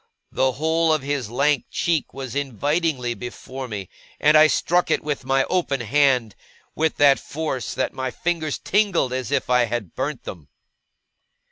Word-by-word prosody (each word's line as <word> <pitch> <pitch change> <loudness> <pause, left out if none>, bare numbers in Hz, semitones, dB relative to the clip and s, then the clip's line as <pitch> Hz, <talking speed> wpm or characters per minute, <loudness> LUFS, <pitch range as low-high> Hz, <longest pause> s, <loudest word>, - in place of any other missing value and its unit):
The 130 0 +1
whole 160 +3 +1
of 155 -3 +1
his 140 -5 -2
lank 140 +2 +1
cheek 165 -4 -1
was 135 -2 -7
invitingly 140 0 -1
before 130 +2 -7
me, 100 -5 -6 0.3
and 150 +1 +4
I 155 0 +8
struck 175 +3 +1
it - - +1
with 145 -3 -3
my 135 0 +2
open 155 -7 -1
hand 125 -3 +2 0.4
with 160 0 0
that 140 -1 +5
force 150 -5 -4
that - - -1
my 130 0 -3
fingers 160 +1 -2
tingled 190 -10 +1
as 130 -3 -3
if - - 0
I 125 -1 +3
had 115 -6 -4
burnt 135 0 -3
them. 80 -6 -9
135 Hz, 160 wpm, -23 LUFS, 125-155 Hz, 0.4 s, I